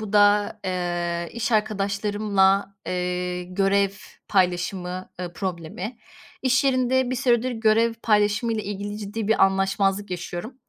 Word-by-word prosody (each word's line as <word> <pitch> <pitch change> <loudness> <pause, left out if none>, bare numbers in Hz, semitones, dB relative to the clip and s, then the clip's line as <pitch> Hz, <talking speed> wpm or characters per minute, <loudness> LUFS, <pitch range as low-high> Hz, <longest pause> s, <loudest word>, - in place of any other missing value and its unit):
bu 215 -1 -6
da, 205 0 +5
eee, 175 -2 -2
iş 235 +1 -2
arkadaşlarımla, 200 -1 +1
eee, 180 0 -2
görev 195 +2 +2 0.4
paylaşımı, 180 -1 0
ııı, 175 -1 -5
problemi. 185 +5 -5 0.4
İş 265 +2 +3
yerinde 260 -1 +2
bir 255 - -1
süredir 245 0 +2
görev 225 0 +2
paylaşımıyla 210 +1 +2
ilgili 205 +1 -5
ciddi 210 +1 -4
bir 220 - +5
anlaşmazlık 195 +1 +1
yaşıyorum 175 +6 -5
200 Hz, 120 wpm, -24 LUFS, 185-220 Hz, 0.4 s, da